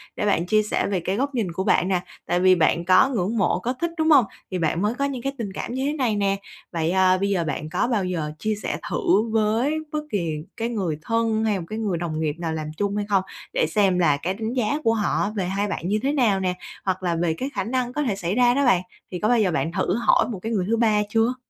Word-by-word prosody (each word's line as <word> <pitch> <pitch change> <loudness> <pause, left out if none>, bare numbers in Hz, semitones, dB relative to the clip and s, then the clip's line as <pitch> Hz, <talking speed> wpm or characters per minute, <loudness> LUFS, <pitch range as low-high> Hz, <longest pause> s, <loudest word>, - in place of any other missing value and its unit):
để - - -2
bạn 185 -4 +2
chia 215 +3 +3
sẻ 210 - -1
về 195 -2 0
cái 185 +3 -2
góc 275 +4 -1
nhìn 210 -8 -1
của 185 +3 -3
bạn 185 - +2
nè. 185 -2 +1 0.2
Tại 175 +1 +1
vì 185 0 +5
bạn 170 0 +2
có 185 +8 +5
ngưỡng 225 -3 -1
mộ, 185 -3 +2
có 240 +6 -2
thích, 340 0 0
đúng 315 0 +2
hông? 275 -6 +7 0.3
Thì 185 - -2
bạn 165 +1 0
mới 210 +3 +1
có 280 +3 -1
những 270 -4 -3
cái 275 +2 -2
tình 205 -5 -4
cảm 235 - -5
như 260 +1 -1
thế 290 - 0
này 255 -8 0
nè. 200 -1 +1 0.4
Vậy, 165 -1 0
à, 185 0 +4
bây 200 +2 0
giờ 190 -4 +1
bạn 155 -1 -4
có 180 +7 0
bao 220 -6 0
giờ 165 -5 -2
chia 215 +3 -1
sẻ 205 - -3
thử 290 - +2
với 225 +6 +1 0.2
bất 305 - -1
kỳ 170 -5 -1 0.3
cái 230 +1 -1
người 190 -10 -2
thân 225 +2 0
hay 210 -3 +1
một 170 - -6
cái 215 - -4
người 205 -6 -1
đồng 165 -2 -3
nghiệp 155 -2 -1
nào 165 -2 -2
làm 155 -1 -4
chung 200 0 -1
hay 205 0 -1
không? 195 -2 +3 0.3
Để - - +2
xem 190 0 +2
là 150 -5 +3
cái 175 +6 -2
đánh 220 +3 -4
giá 250 +2 0
của 225 - +3
họ 205 -2 0
về 195 -3 -1
hai 195 +3 -1
bạn 190 -3 -3
như 210 +3 +1
thế 275 - +2
nào 230 -9 +2
nè? 185 -1 0 0.3
Hoặc 185 -1 -1
là 175 -2 0
về 165 -1 0
cái 260 +12 -4
khả 195 - -1
năng 245 +3 -2
có 295 - -1
thể 230 -8 0
xảy 180 0 -2
ra 245 0 +4
đó 280 +2 +2
bạn. 185 -8 +4 0.3
Thì 180 - -4
có 210 - +1
bao 245 -1 +4
giờ 195 -4 +2
bạn 165 0 -1
thử 180 +2 0
hỏi 240 - +3
một 195 - -5
cái 225 - -4
người 195 -5 0
thứ 230 - +2
ba 215 -2 +3
chưa? 225 +3 +2
205 Hz, 280 wpm, -23 LUFS, 180-230 Hz, 0.4 s, hông